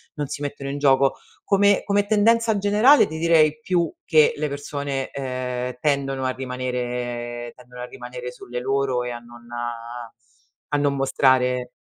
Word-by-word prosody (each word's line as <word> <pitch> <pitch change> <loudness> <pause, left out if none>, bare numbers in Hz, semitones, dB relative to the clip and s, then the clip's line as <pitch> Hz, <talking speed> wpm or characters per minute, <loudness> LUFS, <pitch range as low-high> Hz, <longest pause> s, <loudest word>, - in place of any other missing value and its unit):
non 145 -1 -3
si 145 - -6
mettono 140 -1 -5
in 140 - -3
gioco. 135 -1 +3 0.3
Come 200 0 +3
come 200 0 +2
tendenza 220 +1 +3
generale 210 +8 +5
ti 160 - -6
direi 160 -2 +3
più 170 -1 0
che 155 -2 +5
le 150 0 -2
persone, 140 -1 -4
ehm, 125 -2 -4
tendono 135 -2 0
a 130 - +1
rimanere 125 -2 -4
tendono 125 0 -12
a - - -4
rimanere 125 0 -8
sulle 125 0 -7
loro 135 -1 0
e 125 - -4
a 120 - -6
non 120 0 -15 1.3
a - - +4
non 145 -1 +1
mostrare 130 -2 +2
135 Hz, 150 wpm, -23 LUFS, 125-155 Hz, 1.3 s, generale